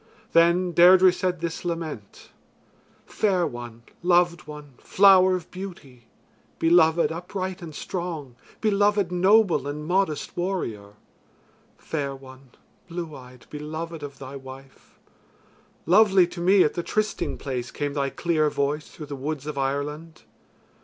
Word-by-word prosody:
Then 170 +2 +4
Deirdre 180 +2 +7
said 180 -2 -2
this 170 -1 -4
lament: 165 - -6 0.7
"Fair 190 -5 0
one, 120 -3 -8 0.2
loved 175 -1 +2
one, 150 -2 -10
flower 190 -1 +5
of 175 -3 -7
beauty; 150 -11 -10 0.5
beloved 165 0 +4
upright 185 +2 -5
and 160 -3 -9
strong; 165 -9 -5 0.3
beloved 205 -3 +2
noble 185 -5 +3
and 150 +1 -5
modest 175 -3 -1
warrior. 115 - -4 0.8
Fair 140 -3 -4
one, 130 0 -15 0.4
blue 170 -3 -6
eyed, 125 -1 -14
beloved 155 +2 -6
of 140 -2 -8
thy 135 +1 -9
wife; 135 0 -13 0.9
lovely 190 +1 +5
to 170 0 -8
me 185 +2 +5
at 150 - 0
the 175 - -2
trysting 215 +4 -2
place 125 -3 -4
came 145 -1 -4
thy 140 -1 -1
clear 155 -1 0
voice 145 +2 -2
through 155 - -10
the 145 -1 -7
woods 145 +1 -5
of 150 -1 -5
Ireland. 145 +4 -4
165 Hz, 130 wpm, -24 LUFS, 140-180 Hz, 0.9 s, Deirdre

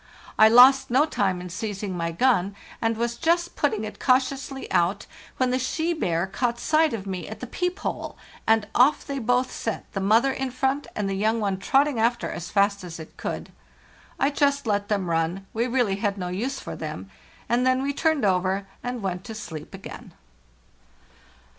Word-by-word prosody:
[| - - -22
lost 250 +5 +7
no 265 +5 +4
time 195 - 0
in 180 - -7
seizing 195 +1 -4
my 170 -1 -2
gun, 200 -1 +2 0.3
and 225 -1 0
was 235 +1 -1
just 345 +1 +1
putting 220 -8 0
it 215 - -7
cautiously 265 +1 0
out, 175 +4 +1 0.3
when 255 -1 +1
the 255 - +1
she 320 +6 -1
bear 175 - 0
caught 235 +5 -1
sight 310 +4 +2
of 210 -4 -4
me 185 -4 -4
at 220 0 -8
the 250 - -5
peep 360 +9 -2
hole, - - -4 0.3
and 220 -1 +3
off 260 +5 +4
they 280 -1 -3
both 250 +2 +1
set, 225 - -4
the 195 - -2
mother 225 +7 +3
in 265 0 -3
front, 265 +3 -1
and 210 -2 -1
the 195 - -1
young 215 +4 +1
one 200 -3 0
trotting 270 +4 +2
after 235 +1 +1
as 175 - -6
fast 200 -1 +2
as 170 -2 -8
it 160 - -11
could. - - -5 0.7
I 275 - +2
just 280 -1 +1
let 205 -2 0
them 200 -4 -1
run—we 175 +7 -1
had 250 - -4
really 205 -5 +1
no 180 -2 -3
use 235 +10 -3
for - - -7
them - - -7 0.2
— - - -27
and 240 +1 +2
then 255 +1 +2
we 280 +1 -1
turned 315 -4 +1
over 190 +1 +1 0.2
and 245 -3 -4
went 180 -1 -3
to 225 - -7
sleep 160 -8 -8
again. - - -10
225 Hz, 190 wpm, -25 LUFS, 195-265 Hz, 0.7 s, lost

